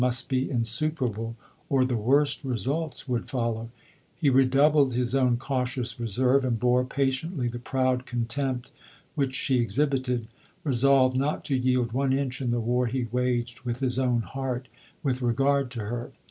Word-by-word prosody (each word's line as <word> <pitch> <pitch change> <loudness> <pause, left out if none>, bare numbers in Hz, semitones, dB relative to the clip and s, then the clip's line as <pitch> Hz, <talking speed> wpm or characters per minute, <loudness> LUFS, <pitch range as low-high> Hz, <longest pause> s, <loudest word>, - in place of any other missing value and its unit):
143 125 0 +2
must 130 - -5
be 130 0 0
insuperable, 115 -2 -1 0.3
or 130 -2 +3
the 130 -1 0
worst 140 +8 +2
results 135 - -2
would 120 -2 -2
follow: 115 -3 -2 0.5
he 145 -5 +3
redoubled 135 +1 +4
bis 125 0 0
own 130 -3 +3
cautious 125 -1 -2
reserve, 125 +4 +2
and 120 -3 0
bore 125 +1 +3
patiently 135 +2 -1
the 120 0 -4
proud 130 0 0
contempt 125 +1 -2 0.4
which 135 -2 -1
she 130 -2 +1
exhibited, 125 -2 0 0.4
resolved 130 -1 +4
not 145 +3 -1
to 140 - 0
yield 125 -2 +1
one 135 +2 +1
inch 135 -1 -1
in 125 - -1
the 120 0 +1
war 120 +2 +1
he 125 +2 -1
waged 120 -1 -1
with 120 -1 -3
his 130 -2 0
own 125 -3 +1
heart, 130 -1 -4 0.4
with 130 -3 0
re 120 -1 +1
gard 140 -1 +2
to 120 -2 -5
her. 120 +3 -4
125 Hz, 165 wpm, -27 LUFS, 120-135 Hz, 0.5 s, redoubled